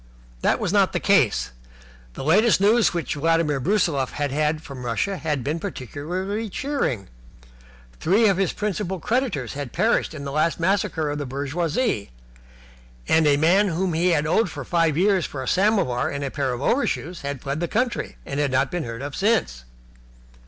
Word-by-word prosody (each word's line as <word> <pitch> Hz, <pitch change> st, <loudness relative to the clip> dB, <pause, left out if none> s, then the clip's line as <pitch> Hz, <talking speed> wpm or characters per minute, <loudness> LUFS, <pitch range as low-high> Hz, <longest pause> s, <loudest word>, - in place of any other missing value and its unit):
This -, -, +2 dB
was -, -, -2 dB
not -, -, +3 dB
the -, -, 0 dB
case. -, -, +2 dB, 0.6 s
The -, -, -6 dB
latest 205 Hz, -, +4 dB
news 215 Hz, +4 st, +4 dB
which 170 Hz, -2 st, -2 dB
Vladimir 160 Hz, -1 st, +1 dB
Brusiloff 150 Hz, -4 st, +1 dB
had 145 Hz, -2 st, -2 dB
had 155 Hz, +2 st, 0 dB
from 135 Hz, -4 st, -8 dB
Russia 125 Hz, -, -1 dB
had 150 Hz, -6 st, -2 dB
been 150 Hz, +5 st, -2 dB
particularly 185 Hz, -, -4 dB
cheering. 195 Hz, -, -2 dB, 0.9 s
Three 210 Hz, +6 st, +3 dB
of 195 Hz, -3 st, +2 dB
his 195 Hz, -3 st, +1 dB
principal 200 Hz, -3 st, -3 dB
creditors 220 Hz, -, -1 dB
had 140 Hz, -3 st, -6 dB
perished 220 Hz, -6 st, +1 dB
in 140 Hz, -, -7 dB
the 140 Hz, -, -5 dB
last 155 Hz, +4 st, +1 dB
massacre 170 Hz, -4 st, 0 dB
of 145 Hz, -, -3 dB
the 145 Hz, -, -4 dB
bourgeoisie, 145 Hz, -, -1 dB, 1.0 s
and 160 Hz, -1 st, +4 dB
a 145 Hz, -1 st, +4 dB
man 180 Hz, +7 st, +4 dB
whom 180 Hz, 0 st, -1 dB
he 170 Hz, +2 st, +2 dB
owed 160 Hz, +7 st, +1 dB
for 145 Hz, -4 st, -7 dB
five 165 Hz, -3 st, +1 dB
years 190 Hz, -1 st, +2 dB
for 135 Hz, -2 st, -6 dB
a -, -, -7 dB
samovar 190 Hz, -, +2 dB
and 140 Hz, 0 st, -4 dB
a 135 Hz, -, -3 dB
pair 140 Hz, -3 st, -1 dB
of 125 Hz, +2 st, -4 dB
overshoes 180 Hz, -, 0 dB
had 140 Hz, -1 st, -4 dB
fled 140 Hz, +2 st, -2 dB
the 175 Hz, -, -1 dB
country, 240 Hz, +6 st, -2 dB
and 140 Hz, -, -4 dB
had 145 Hz, -1 st, +1 dB
not 130 Hz, +1 st, +1 dB
been 175 Hz, -5 st, -2 dB
heard 115 Hz, +2 st, -6 dB
of 145 Hz, 0 st, -5 dB
since. 190 Hz, -, 0 dB
160 Hz, 180 wpm, -23 LUFS, 140-195 Hz, 1.0 s, latest